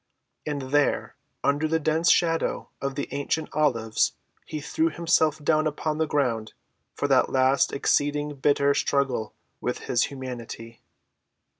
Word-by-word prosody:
And 145 -2 -2
there 145 -1 +1 0.3
under 145 +2 +2
the 160 +1 +1
dense 160 +2 +2
shadow 165 -1 +1
of 140 0 -2
the 140 - -3
ancient 145 +3 -2
olives 115 -8 +1 0.3
he 155 - -4
threw 320 - 0
himself 165 - +2
down 155 +1 +3
upon 155 +1 -2
the 160 - +1
ground 120 -7 -1 0.4
for - - -1
that - - +3
last 130 +1 +3
exceeding 145 +1 +1
bitter 140 0 +2
struggle 130 -7 0 0.2
with 125 - -3
his 120 0 +1
humanity. 120 -3 -8
145 Hz, 135 wpm, -26 LUFS, 130-155 Hz, 0.4 s, down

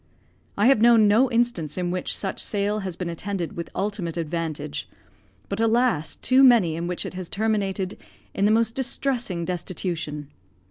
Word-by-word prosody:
I 205 - +3
have 255 -3 +5
known 230 -2 +6
no 230 +6 +4
instance 230 - 0
in 175 -1 -1
which 180 0 -2
such 195 - -4
sale 205 +1 -1
has 190 -4 -5
been 180 - -4
attended 175 +1 -4
with 170 - -5
ultimate 195 -5 -2
advantage; 165 - -4 0.6
but, 200 +3 -3
alas! 225 -9 +2
too 260 +1 +3
many 225 -11 +5
in 170 +1 -3
which 180 0 -2
it - - -6
has 185 -2 -6
terminated 200 -3 -1 0.3
in 195 - +1
the 210 - +4
most 225 0 +2
distressing 245 -8 -1
destitution. 165 -5 -4
195 Hz, 160 wpm, -24 LUFS, 170-225 Hz, 0.6 s, known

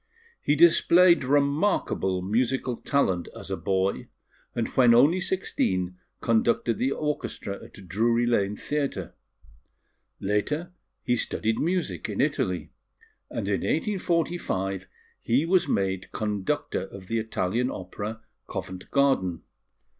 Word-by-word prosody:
He 145 - +2
displayed 170 +1 +6
remarkable 140 - +1
musical 120 +4 0
talent 95 -11 0
as - - -7
a - - +1
boy; 95 0 -1 0.5
and 115 -2 0
when 120 -3 +5
only 155 +9 +5
sixteen 90 - -1 0.2
conducted 115 0 +2
the 130 +2 +1
orchestra 150 -9 -3
at 95 -2 -13
Drury 115 +6 +2
Lane 105 -4 +1
Theatre. 140 - -3 1.1
Later 150 - -1 0.3
he 125 - +2
studied 110 -1 -1
music 180 +3 -1
in - - -4
Italy; - - 0 0.6
and - - -4
in - - 0
1845 170 - -1 0.3
he 130 +7 +2
was 175 0 +3
made 95 -1 -1
conductor 105 -3 -2
of 100 -1 -11
the 115 +4 -1
Italian 110 +2 -1
Opera, 105 +4 -6 0.3
Covent 95 0 -6
Garden. 135 - +2
115 Hz, 115 wpm, -26 LUFS, 95-145 Hz, 1.1 s, displayed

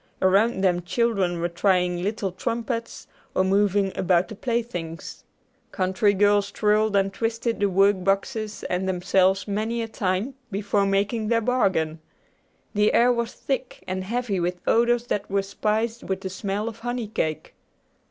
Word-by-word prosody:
Around 195 +3 +3
them 175 -2 +2
children 190 -2 0
were 170 - 0
trying 180 0 +1
little 205 0 -2
trumpets, 230 +3 -4 0.3
or 185 - +3
moving 195 0 +2
about 180 +1 +2
the 215 - -7
playthings. 195 -9 -4 0.5
Country 195 +2 +1
girls 205 0 +3
twirled 210 0 +2
and 195 0 +2
twisted 230 0 -2
the 200 0 +2
work 195 0 +3
boxes 210 +3 -1
and 185 +1 -1
themselves 190 +2 +2
many 215 +3 -1
a - - -4
time 205 +3 -1 0.2
before 200 -1 0
making 205 +3 0
their 230 +1 +3
bargain. 190 -10 +1 0.7
The 210 0 +3
air 245 +1 +5
was 235 -1 -2
thick 265 -2 -4
and 185 0 -2
heavy 225 -1 -2
with 180 +1 -1
odors 240 +1 +3
that 205 -4 -2
were 200 0 +1
spiced 220 +4 -1
with 190 0 -3
the 190 - -5
smell 200 +3 -3
of 225 - -6
honey 240 -1 -3
cake. 155 -7 -3
200 Hz, 150 wpm, -24 LUFS, 185-230 Hz, 0.7 s, air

